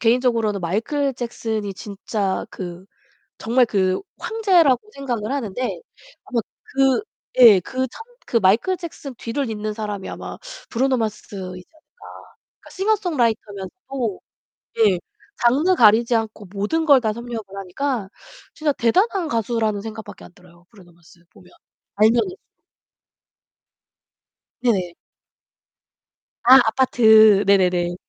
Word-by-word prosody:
개인적으로는 230 -4 +1
마이클 250 - -1
잭슨이 220 -4 -4
진짜 200 -1 -3
그 180 0 -8 0.5
정말 245 +2 +2
그 190 -4 0 0.2
황제라고 370 - +3
생각을 250 -5 -4
하는데, 255 - -3 0.4
아마 245 -3 -1 0.4
그 270 - +3 0.4
예 225 -6 +9
그 260 +7 -3
참 450 - -5
마이클 225 - +3
잭슨 310 -6 -8
뒤를 235 +2 -3
잇는 215 0 -4
사람이 210 -3 -5
아마 - - -7 0.3
브루노 260 +2 +1
마스이지 190 -4 -6
않을까. 315 +9 -16 0.4
싱어송라이터면서도 260 - -2 0.6
예 205 -5 +4 0.4
장르 290 +10 +3
가리지 230 0 +5
않고 220 -2 -2
모든 210 +12 -1
걸 280 -3 +6
다 220 -2 -1
섭렵을 235 -1 -6
하니까 210 +2 -3 0.5
진짜 305 -2 0
대단한 355 - +1
가수라는 225 -2 -1
생각밖에 220 0 -9
안 - - -15
들어요. 175 -1 -21
브루노 185 -6 -18
마스 170 +1 -22
보면. 180 +2 -19 0.5
알면은. 230 - +3 2.3
네네. 190 -8 0 1.5
아, 255 +2 +9
아파트. 220 -4 +5
네네네. 180 -3 +2
225 Hz, 260 characters per minute, -21 LUFS, 200-265 Hz, 2.3 s, 예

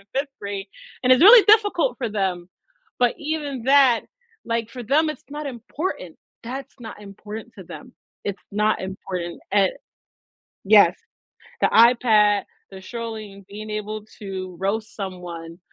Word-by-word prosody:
5th 280 +2 0
grade, 200 -1 -5 0.4
and 255 - +4
it's 255 +6 +6
really 440 +1 +10
difficult 430 +3 +3
for 245 -4 -2
them. 190 -4 -2 0.5
But 245 -1 +3
even 295 -5 -4
that 270 -4 +5 0.5
like 230 -1 -1
for 245 0 -8
them 305 +7 +2
it's 305 - -7
not 295 0 -5
important, 245 - -5 0.3
that's 265 +3 -7
not 220 -3 -10
important 210 +3 -9
to 190 - -9
them. 255 +8 -11 0.3
It's 200 -1 -4
not 210 +1 +1
important 185 -2 -6
a 195 -2 +4 1.0
yes. - - +6 0.6
The - - +4
iPad, 220 -3 +5 0.3
the 190 - -9
scrolling, 215 -2 -8
being 215 +2 -9
able 210 0 -5 0.2
to 185 -3 -6
roast 215 +3 -2
someone, 175 -4 -7
215 Hz, 135 wpm, -23 LUFS, 195-255 Hz, 1.0 s, really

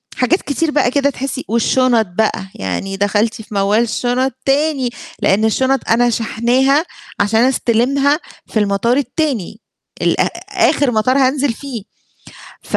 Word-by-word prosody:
حاجات 310 +9 +1
كتير 305 +2 -1
بقى 270 -4 +2
كده 280 0 +2
تحسي 270 0 -5
والشنط 235 0 +2
بقى 190 +1 -1
يعني 95 - -4
دَخَلتِ 205 +3 +1
في 215 - -12
موال 200 +2 +2
الشنط 245 +3 -1
تاني، 275 -2 +1 0.3
لأن 210 +3 +2
الشنط 265 +4 0
أنا 240 +1 +3
شاحناها 250 +7 +1 0.3
عشان 215 +3 +2
استلِمها 270 +4 +2 0.3
في 220 - -1
المطار 210 +5 +1
التاني 255 - -2 0.4
الأ - - +2 0.5
آخر 275 -4 +1
مطار 240 +5 +2
هانزِِل 265 -1 +2
فيه، 250 -5 -7 0.8
ف - - -2
245 Hz, 130 wpm, -17 LUFS, 220-275 Hz, 0.8 s, أنا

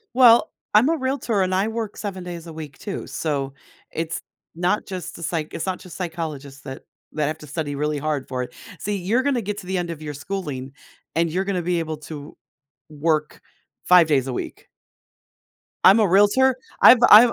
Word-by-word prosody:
Well, 240 -2 +7 0.2
I'm 245 +8 +6
a 330 - +2
realtor, 260 -6 0
and 185 0 +1
I 195 +3 +2
work 225 -2 -4
7 190 -3 -5
days 175 -1 -7
a 165 - -8
week 155 -3 -8
too 200 - -6
so, 140 -4 -2 0.4
it's 165 0 -3 0.3
not 180 +4 0
just 185 -3 -6
the 170 - -9
psych 160 -2 -3
it's 165 - -3
not 185 -1 -2
just 180 - -11
psychologists 155 -6 -5
that 135 -1 -8 0.3
that 150 -1 0
have 155 +1 -3
to 150 - -11
study 145 -1 -3
really 150 +1 -1
hard 150 -2 -2
for 130 -1 -3
it. - - -9 0.3
See, 205 0 -2
you're 210 +8 +1
gonna 270 -4 +1
get 205 0 -4
to 180 - -11
the 190 0 -1
end 175 -1 -2
of 160 -2 -6
your 150 -1 -5
schooling, 145 -5 -5 0.4
and 165 -1 +1
you're 185 +3 0
gonna 190 -3 -1
be 175 -1 0
able 160 -1 -3
to 150 -1 -9 0.5
work 155 0 -1 0.4
5 180 -3 +7
days 135 -4 +2
a 130 - -3
week. - - -6 1.2
I'm 195 +4 +8
a 210 - +4
realtor 205 +8 +4 0.2
I've 245 - +9
I'm 220 +4 +10
170 Hz, 195 wpm, -23 LUFS, 150-200 Hz, 1.2 s, I'm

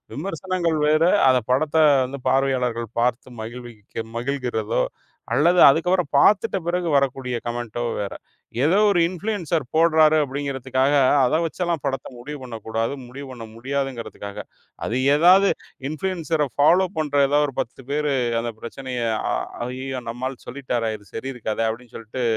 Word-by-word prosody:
விமர்சனங்கள் 170 0 -2
வேற. 155 +1 +4 0.3
அத 130 -1 +4
படத்த 150 +4 0 0.3
வந்து 135 +1 -7
பார்வையாளர்கள் 125 -4 0
பார்த்து 125 0 -1
மகிழ்விக்க 115 -1 -8
மகிழ்கிறதோ 125 -4 -1 0.5
அல்லது 175 +4 +4
அதுக்கப்புறம் 170 +3 +3
பாத்துட்டு 205 +6 +4
பிறகு 175 0 -1
வரக்கூடிய 135 -2 0
கமெண்ட்டோ 120 0 -3 0.2
வேற. 100 -1 -3 0.5
ஏதோ 175 +7 +4
ஒரு 190 -4 +3
இன்ஃபுளூன்சர் 180 -4 -2
போடுறாரு, 160 -1 +5
அப்டிங்கறதுக்காக 135 -1 -1 0.3
அத 155 +6 +2
வச்சு 165 +3 -6
எல்லாம் 170 -3 -1
படத்த 135 - -2
முடிவு 145 +5 -7
பண்ணக் 115 -3 -8
கூடாது. 115 +3 -1
முடிவு 135 +3 -9
பண்ண 120 -3 -8
முடியாதுங்கறதுக்காக. 120 -5 -4 0.5
அது 120 - -1 0.2
ஏதாவது 185 +5 +6 0.4
இன்ஃபுளூன்சர 160 -2 -1
ஃபாலோ 175 +6 +4
பண்ற 145 -2 -1
ஏதாவது 145 +1 +2
ஒரு 135 - -12
10 130 +3 -9
பேரு 150 0 0 0.3
அந்தப் 115 -2 -6
பிரச்சனையை 125 -1 -4 0.2
அ - - +1 0.3
அய்யயோ 130 +1 -5
நம்ம 120 +3 -3
ஆள் 130 -2 -11
சொல்லிட்டாரா? 120 -3 -2
இது 105 -1 -21
சரியிருக்காதா? 115 -3 -3
அப்டின்னு 120 +1 -11
சொல்லிட்டு 115 +3 -5
135 Hz, 135 wpm, -23 LUFS, 120-155 Hz, 0.5 s, ஏதாவது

